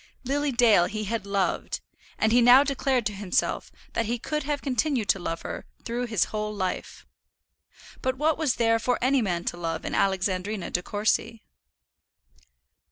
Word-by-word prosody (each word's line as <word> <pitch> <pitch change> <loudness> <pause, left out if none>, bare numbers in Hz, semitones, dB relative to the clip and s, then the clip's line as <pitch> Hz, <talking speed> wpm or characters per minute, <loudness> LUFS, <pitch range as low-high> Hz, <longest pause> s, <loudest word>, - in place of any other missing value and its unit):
Lily 285 +2 0
Dale 225 -7 +5
he 215 +3 -4
had 210 -1 -3
loved; 200 -1 -1 0.4
and 220 - +2
he 245 +2 +5
now 245 +3 +8
declared 270 -3 0
to 210 - -1
himself 195 -2 -1 0.2
that 230 - 0
he 240 +2 -1
could 300 +6 -3
have 290 0 -2
continued 255 -3 0
to 195 - +3
love 165 -1 -4
her - - -6 0.2
through 240 +1 -2
his 220 -5 +2
whole 210 0 -2
life. 190 -3 -4 1.0
But 260 0 -1
what 305 +2 +2
was 305 -6 0
there 230 -1 +2
for 245 +2 +1
any 260 +1 +3
man 175 -5 -1
to - - -3
love 165 -2 -3
in - - -3
Alexandrina 190 +1 0
De 180 - 0
Courcy? 215 +3 -1
225 Hz, 165 wpm, -26 LUFS, 195-255 Hz, 1.0 s, now